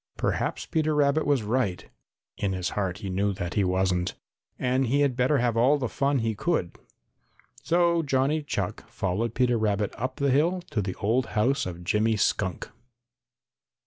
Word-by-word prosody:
Perhaps - - -1
Peter 155 -1 0
Rabbit 145 +1 +2
was 140 -6 +2
right 105 -4 -1 0.5
(in 100 -2 -1
his 90 -1 -2
heart 95 -3 -2
he 95 - -6
knew 100 +2 0
that 90 -3 -4
he 100 - +2
wasn't) 90 -1 0 0.4
and 130 +1 +1
he 140 +5 +2
had 140 -3 +2
better 130 +4 +2
have 120 -2 +1
all 130 +6 +4
the 130 -3 -2
fun 140 +4 0
he 115 -2 0
could. 105 - -1 0.9
So 170 0 +2
Johnny 140 +1 +1
Chuck 105 -11 -4
followed 105 +5 -2
Peter 125 -2 +2
Rabbit 105 -1 0
up 130 +3 -2
the 140 -1 +1
hill 170 +7 +2
to 105 - 0
the 95 -2 -4
old 115 +6 0
house 125 +1 +2
of 90 -1 -7
Jimmy 110 +5 +2
Skunk. 95 -3 -1
120 Hz, 170 wpm, -26 LUFS, 100-140 Hz, 0.9 s, all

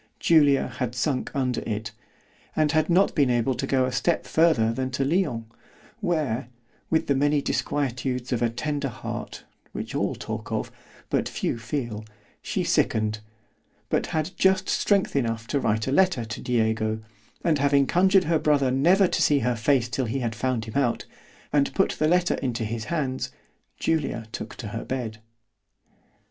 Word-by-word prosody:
——Julia 145 -4 +4
had 125 -1 -2
sunk 130 +1 -1
under 130 -3 0
it——and 110 +7 -4
had 155 0 +2
not 185 +3 +4
been 140 -4 +3
able 120 +2 +2
to 135 - -3
go 130 -1 +2
a 130 - -2
step 170 +5 0
farther 125 -9 +3
than 130 +2 -2
to 130 +1 -1
Lyons, 140 -8 0 0.5
where, 155 - -1 0.4
with 160 - +2
the 140 - +2
many 145 +2 +2
disquietudes 130 -3 -2
of 120 - -1
a 120 - +3
tender 145 +4 -2
heart, - - -6 0.3
which - - -5
all - - 0
talk - - -6
of——but - - -4
few 115 - -2
feel—she 110 -4 -5
sicken'd, 110 -1 +1 0.7
but - - 0
had 155 +2 -2
just 190 0 +3
strength 200 -2 +2 0.3
to 140 - 0
write 110 -3 0
a 135 - -1
letter 180 -7 +3
to 110 -1 -6
Diego; 110 -2 0 0.4
and 155 -4 +2
having 140 0 +4
conjured 190 +4 +4
her 160 0 +1
brother 140 -4 +2
never 175 +9 +4
to - - -1
see 145 - +4
her 125 -1 +1
face 120 +1 +2
till 120 +2 -2
he 120 +4 -2
had 115 -2 -1
found 120 -1 -1
him 110 +3 -4
out, 120 -3 0 0.5
and 145 -1 +2
put 195 - +3
the 155 - 0
letter 175 +1 +3
into 120 -4 -2
his 110 0 -4
hands, 135 -5 -2 0.5
Julia 155 -8 -1
took - - -6
to 110 - -6
her 115 +2 -5
bed. 115 -5 -4
130 Hz, 160 wpm, -25 LUFS, 115-155 Hz, 0.7 s, Julia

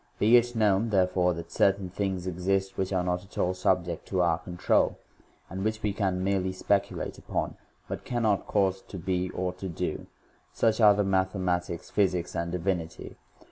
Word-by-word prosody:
Beit 120 +2 +4
known, 105 0 +3
therefore, 90 -3 +2
that 85 - -7
certai 100 0 +3
n 95 - -5
thing 95 0 -1
s 90 -1 -7
exist 95 +2 -1
which 95 0 -2
are 90 -2 +1
not. 90 0 -1
at 100 - -16
all 90 - +1
subject.tD 90 0 0
our 85 -2 +3
control, 90 +1 +1 0.5
and 95 +2 -5
which 110 +1 -2
we 105 -2 0
can 95 -3 -1
merely 95 -1 +1
speculate 100 +1 -1
upon, - - -3 0.3
b - - -4
ut - - -6
cannot 110 -5 0
cause 95 -2 +1
to 95 - -9
be 90 +1 -1
or 90 0 -2
to 95 +1 -6
do; 80 - -4 0.5
suchare 110 -2 +5
maxhsiaiL 95 -2 +1
tics, 85 -2 -7
physics, 90 -4 +1
and 85 0 -2
divinity 90 -2 -2
j. - - -17
95 Hz, 180 wpm, -28 LUFS, 90-100 Hz, 0.5 s, suchare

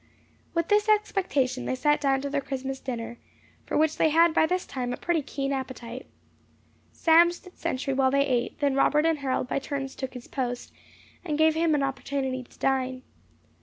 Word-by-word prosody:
With 335 -1 0
this 420 +1 +3
expectation 360 -12 +1
they - - -1
sat 295 +3 +2
down 270 -2 +2
to 280 - -3
their 285 -1 0
Christmas 270 0 -4
dinner, 235 -2 -5 0.5
for - - -1
which 315 0 +2
they 315 - +4
had 330 +2 +5
by 315 - +4
this 365 +1 -1
time 250 -2 -4
a - - -5
pretty 345 -2 0
keen 275 0 -3
appetite. 260 -2 -6 0.8
Sam 335 +1 +5
stood 360 +1 -12
sentry 275 -4 -2
while 265 0 +3
they 280 +1 +3
ate; 245 -3 -1
then 285 -1 +2
Robert 295 +3 +3
and 325 -2 +2
Harold 260 -2 -1
by - - -1
turns 275 -1 -4
took 265 -1 -6
his 245 - -9
post, 245 -3 -4 0.5
and 305 -5 -2
gave 315 0 +5
him 320 -1 +2
opportunity 270 -1 -2
to 250 - -17
dine. 260 -1 0
275 Hz, 185 wpm, -27 LUFS, 260-315 Hz, 0.8 s, had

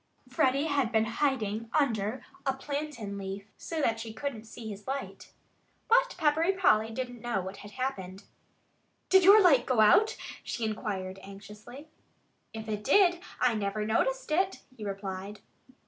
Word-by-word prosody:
Freddie 260 +3 +1
had 280 -6 0
been 220 -1 +3
hiding 230 -3 -1
under 230 -3 -1 0.2
a 270 -1 +1
plantain 270 -8 -5
leaf, 195 +1 -6
so 325 - -5
that 225 -1 +1
she 225 -1 -6
couldn't 225 -1 -5
see 225 0 -9
his 205 +1 -8
light. 275 +1 -5 0.6
But - - +3
Peppery 320 +3 +2
Polly 225 - +3
didn't 245 0 -5
know 240 -4 -1
what 190 +2 -7
had 205 - -10
happened. 200 -7 -4 0.9
"Did 380 -1 +6
your 400 +4 +9
light 275 -8 +5
go 255 -4 +1
out?" 220 - +5 0.3
she 235 - -3
inquired 195 -3 -4
anxiously. 210 +8 -11 0.6
"If 220 0 -8
it 210 -1 -3
did, 355 - +4 0.2
I 250 -2 +3
never 210 0 -2
noticed - - 0
it," 375 +4 0
he 220 - -9
replied. 195 0 -5
230 Hz, 150 wpm, -29 LUFS, 210-285 Hz, 0.9 s, your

